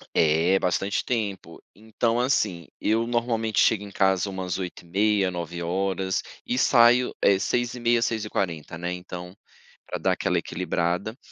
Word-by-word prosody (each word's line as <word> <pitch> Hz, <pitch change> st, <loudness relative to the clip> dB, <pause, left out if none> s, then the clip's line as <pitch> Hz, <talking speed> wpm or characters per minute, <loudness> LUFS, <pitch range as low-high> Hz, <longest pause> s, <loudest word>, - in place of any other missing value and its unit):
É, 80 Hz, +4 st, +4 dB
bastante 95 Hz, +2 st, -1 dB
tempo. 100 Hz, -8 st, -3 dB
Então, 110 Hz, +2 st, -1 dB
assim, 105 Hz, -, 0 dB
eu 115 Hz, +2 st, +1 dB
normalmente 115 Hz, -2 st, 0 dB
chego 105 Hz, -2 st, +3 dB
em 100 Hz, -, -9 dB
casa 95 Hz, 0 st, +2 dB
umas 95 Hz, -2 st, -3 dB
8h30, 95 Hz, +2 st, 0 dB
9h 85 Hz, -1 st, -5 dB, 0.9 s
e 125 Hz, -, 0 dB
saio 125 Hz, 0 st, +5 dB
eh 100 Hz, -1 st, +5 dB
6h30, 120 Hz, +1 st, 0 dB
6h40, 100 Hz, -8 st, -2 dB
né. 85 Hz, +1 st, -4 dB
Então, 90 Hz, +1 st, -7 dB, 0.5 s
pra -, -, -3 dB
dar -, -, +1 dB
aquela -, -, 0 dB
equilibrada 90 Hz, +7 st, -2 dB
100 Hz, 125 wpm, -25 LUFS, 90-115 Hz, 0.9 s, saio